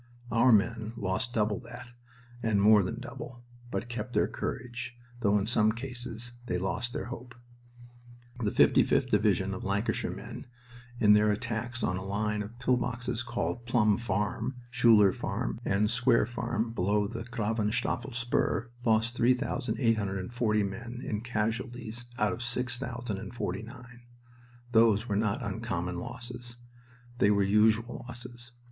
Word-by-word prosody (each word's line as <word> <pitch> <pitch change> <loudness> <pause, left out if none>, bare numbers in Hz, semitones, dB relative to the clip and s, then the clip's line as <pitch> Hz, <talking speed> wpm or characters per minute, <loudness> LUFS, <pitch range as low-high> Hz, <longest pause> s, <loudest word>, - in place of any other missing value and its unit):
Our 115 +2 +5
men 110 +1 +2
lost 105 +4 -1
double 105 -3 +1
that, 120 0 -10 0.5
and 110 -3 +2
more 105 +1 +7
than 105 +5 -3
double, 125 0 -8 0.3
but 120 - -3
kept 120 0 -5
their - - +3
courage, 125 0 -5 0.2
though 105 -3 +3
in 100 - 0
some 110 -1 +3
cases 120 -1 -5 0.2
they 90 - 0
lost 95 +6 -2
their - - -4
hope. 125 -2 -10 1.0
The 110 -4 +1
55th - - +4
Division 100 -2 +2
of 95 - -6
Lancashire 100 +3 0
men, - - -7 0.5
in 105 -2 +7
their 105 0 +5
attacks 115 +2 -3
on 90 - +1
a 95 - -5
line 105 +2 -1
of 105 +3 -8
pill 125 0 +2
boxes 125 -1 -2
called 120 0 -3
Plum 110 -4 +4
Farm, 110 +3 -1 0.2
Schuler 115 -5 +6
Farm, - - -3
and 100 +2 +2
Square 120 +1 +3
Farm, 120 -1 -2
below 105 0 +1
the 115 +2 -5
Gravenstafel 115 +2 -1
Spur, 120 0 0
lost 115 0 +3
3,840 115 -4 +1
men 115 +5 -5
in 105 -1 -2
casualties 120 +1 -3
out 105 0 +2
of 120 - -6
6,049. 120 -1 -4 0.7
Those 115 -1 +4
were 100 - 0
not 110 +4 0
uncommon 95 -5 -3
losses. 120 +3 -7 0.6
They 100 - +5
were 100 -1 +4
usual 110 +4 +3
losses. 120 0 -8
115 Hz, 135 wpm, -30 LUFS, 105-120 Hz, 1.0 s, more